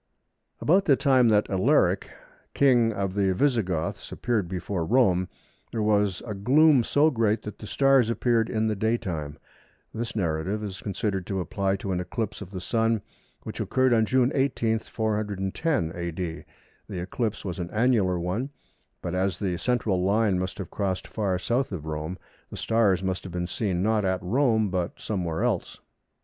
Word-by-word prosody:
About 190 +5 +3
the 140 - +5
time 130 -2 +4
that 105 -2 +3
Alaric, 95 -1 +2 0.5
King 120 -5 +4
of 100 -3 -2
the 95 -2 +1
Visigoths 95 - 0
appeared 115 -7 -1
before 90 -1 -3
Rome, 95 -4 +2 0.4
there 110 -2 -1
was 105 -3 +1
a 110 - -4
gloom 135 +6 +4
so 150 +6 +3
great 115 -3 +1
that 105 - -8
the 105 - -8
stars 135 -3 +3
appeared 115 -1 +1
in 110 -1 0
the 110 -1 0
daytime. 90 -9 -2 0.6
This 115 +1 -4
narrative 95 +2 -1
is 95 -2 -6
considered 100 -3 -2
to 95 -1 -2
apply 95 +2 -1
to 95 0 -4
an 90 - 0
eclipse 110 +4 -4
of 95 - -7
the 95 -2 -6
Sun, 115 +3 0 0.4
which - - -7
occurred 130 -1 +2
on 110 -1 +3
June 130 +1 +3
18, 120 -5 +1
410 105 - -1
A.D. 85 -1 -4 0.4
The 95 -4 -4
eclipse 105 +5 -3
was 90 -1 -4
an 85 -1 -4
annular 110 -5 +2
one, 95 +10 -2 0.5
but 85 - -3
as 95 -1 0
the 95 -3 -1
central 105 -4 0
line 100 -1 +2
must 95 0 -3
have 95 -5 -6
crossed 95 -3 -2
far 100 -4 -1
S. 90 - -5
of 110 - -1
Rome, 80 +3 -4 0.3
the - - -8
stars 105 -5 +2
must 95 -1 -1
have 95 - -8
been 90 0 -2
seen 90 0 -1
not 110 0 +2
at 95 -1 -1
Rome 110 0 +2
but 90 -1 -2
somewhere 90 -6 -2
else. - - -1
105 Hz, 170 wpm, -26 LUFS, 90-115 Hz, 0.6 s, the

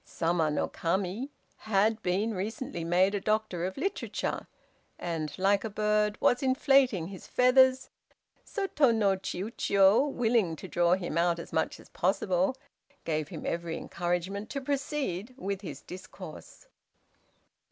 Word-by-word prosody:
Sama 165 -1 0
no 150 - 0
Kami 190 +9 -2 0.3
had 215 +1 +1
been 200 +5 0
recently 200 -2 -4
made 180 +4 +3
a 205 - -1
doctor 215 -5 0
of 185 +1 -4
literature, 390 +1 -3 0.5
and 160 -4 -4
(like 195 +1 +2
a 220 - -3
bird) 210 0 +1
was 245 - +3
inflating 260 - +3
his 190 -2 -10
feathers, 260 +1 +4 0.5
so 400 -2 -3
Tô 275 -9 +3
no 200 -3 +3
Chiûjiô, 195 +5 +2
willing 225 -9 +1
to 190 - -9
draw 175 -1 +2
him 180 -2 -1
out 170 0 +2
as 170 - -9
much 160 - 0
as - - -16
possible, 190 +4 +1 0.5
gave 155 -2 -1
him - - -8
every 170 -1 -2
encouragement 180 +5 -3
to 275 - -3
proceed 265 - -3
with 200 -5 -3
his 195 - -7
discourse. 185 - -10
195 Hz, 140 wpm, -29 LUFS, 175-235 Hz, 0.5 s, feathers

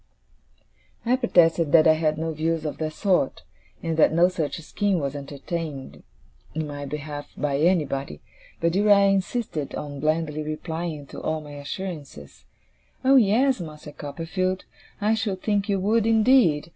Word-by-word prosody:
I 245 +2 +3
protested 170 - +3
that 160 -2 +7
I 160 - +7
had 155 -1 0
no 160 +1 -2
views 160 +1 -1
of 150 - -4
that 155 -1 -2
sort, 185 -6 0 0.4
and 165 -1 -2
that 160 - +5
no 170 +3 +4
such 165 -5 -3
scheme 200 +4 0
was 140 -4 -2
entertained 145 0 -6 0.5
in 160 0 -1
my 145 -1 -6
behalf 145 0 -6
by 140 -1 0
anybody; 145 - 0 0.4
but 170 0 +1
Uriah 200 0 +5
insisted 190 - -2
on 145 -1 -6
blandly 155 0 0
replying 155 0 -4
to - - -9
all 155 0 -1
my 150 -1 -11
assurances, 145 - -7 0.6
'Oh, 270 +1 +6
yes, 245 +4 +3
Master 150 -2 -9
Copperfield, 175 +6 -3 0.3
I 210 +2 +2
should 205 -4 -2
think 205 -1 0
you 200 -1 +1
would, 215 +3 +2
indeed! 220 - +4
165 Hz, 150 wpm, -24 LUFS, 150-195 Hz, 0.6 s, that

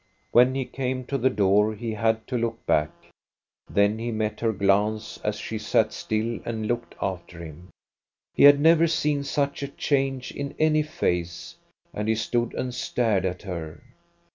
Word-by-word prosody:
When 125 +2 +5
he 135 -1 -1
came 130 0 -3
to 140 - -2
the 130 +2 +3
door, 105 -1 +2
he 115 +1 -4
had 110 0 0
to 130 - -4
look 115 -1 -2
back. 75 0 +2 0.8
Then 100 +2 +2
he 120 +1 -3
met 110 -1 -2
her 115 -1 +1
glance, 105 +2 0
as 105 0 -1
she 110 +1 -5
sat 110 0 +1
still 110 +1 -2
and 110 -2 -4
looked 120 +1 -3
after 90 -2 -4
him. 85 +1 -10 0.6
He - - +5
had 145 0 +8
never 165 +2 +5
seen 150 -3 0
such 140 0 -1
a 140 - -2
change 135 -2 -1
in 140 0 -6
any 155 -1 +3
face, 90 - -3 0.4
and 105 +1 -3
he 110 - +2
stood 120 +2 -1
and 125 -1 -3
stared 115 -6 0
at 90 +1 -3
her. 85 -3 -6
115 Hz, 170 wpm, -25 LUFS, 105-130 Hz, 0.8 s, had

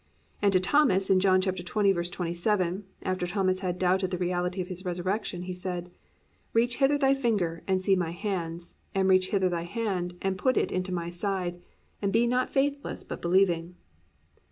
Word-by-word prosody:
And 205 -1 +4
to 185 - +5
Thomas 195 -2 +3
in 190 - +5
John 185 -1 +4
20:27, 185 0 0 0.2
after 185 -1 -1
Thomas 185 0 +1
had 180 -2 -2
doubted 185 +1 +2
the 180 - -2
reality 180 +1 -1
of 180 - -2
His 185 0 -6
resurrection, 180 +1 -2
He 185 0 -4
said, 180 -1 -5 0.6
+"Reach 240 +2 +2
hither 275 +1 +3
thy 270 -1 +4
finger, 205 -11 0
and 190 -1 +2
see 190 +1 +3
my 175 -3 -1
hands; 170 -2 -3 0.2
and 190 -1 +2
reach 185 0 +4
hither 190 -2 +2
thy 170 -1 -2
hand, 180 -4 -2
and 190 -1 -2
put 255 +6 +2
it - - +1
into 185 0 -2
my 170 -1 -2
side: 175 -1 -3 0.4
and 200 -1 0
be 230 +3 +3
not 250 +1 +1
faithless 280 +1 -1
but - - -7
believing." 175 -1 +2
185 Hz, 175 wpm, -28 LUFS, 175-200 Hz, 0.6 s, to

